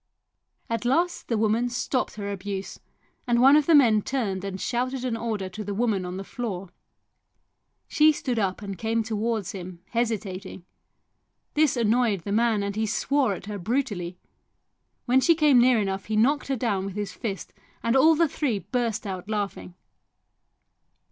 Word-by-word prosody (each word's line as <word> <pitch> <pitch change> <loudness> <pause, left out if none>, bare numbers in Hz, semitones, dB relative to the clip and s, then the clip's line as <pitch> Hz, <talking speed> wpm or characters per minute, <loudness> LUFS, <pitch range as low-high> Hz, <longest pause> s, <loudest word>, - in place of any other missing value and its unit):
At 230 -1 -2
last 335 +9 0
the 230 - 0
woman 225 +3 +1
stopped 250 +1 -2
her 200 -1 -4
abuse, 195 0 -5 0.5
and 240 -1 +3
one 270 +3 +7
of 300 -1 +3
the 330 - +6
men 230 -7 +5
turned 205 -7 -2
and 195 -1 -5
shouted 255 +3 -2
an 240 -3 -1
order 220 -4 -3
to 210 +4 -7
the 200 0 -4
woman 210 -4 0
on 180 +1 -5
the 195 - -5
floor. 195 -5 -5 1.2
She 310 0 +5
stood 255 -5 -2
up 195 0 -1
and 195 -2 -6
came 225 0 0
towards 220 -2 -2
him, 180 -3 -9
hesitating; 200 -6 -3 0.9
this 300 -4 +2
annoyed 230 -3 +2
the 200 - -5
man 220 -1 +2
and 200 0 -3
he 220 0 0
swore 250 0 +1
at 180 - -10
her 205 -1 -5
brutally; 195 -5 -2 0.9
when 260 +1 +4
she 335 +4 +4
came 300 -5 +5
near 245 -1 +5
enough 195 -2 -2
he 215 - -2
knocked 275 +7 +2
her 270 - 0
down 205 -6 -1
with 195 - -7
his 205 -1 -4
fist, 205 -5 -5 0.3
and 230 +2 +1
all 315 +5 +6
the 335 +1 +3
three 275 -6 -1
burst 220 +4 -2
out 190 0 -5
laughing. 205 -4 -3
220 Hz, 170 wpm, -25 LUFS, 195-250 Hz, 1.2 s, one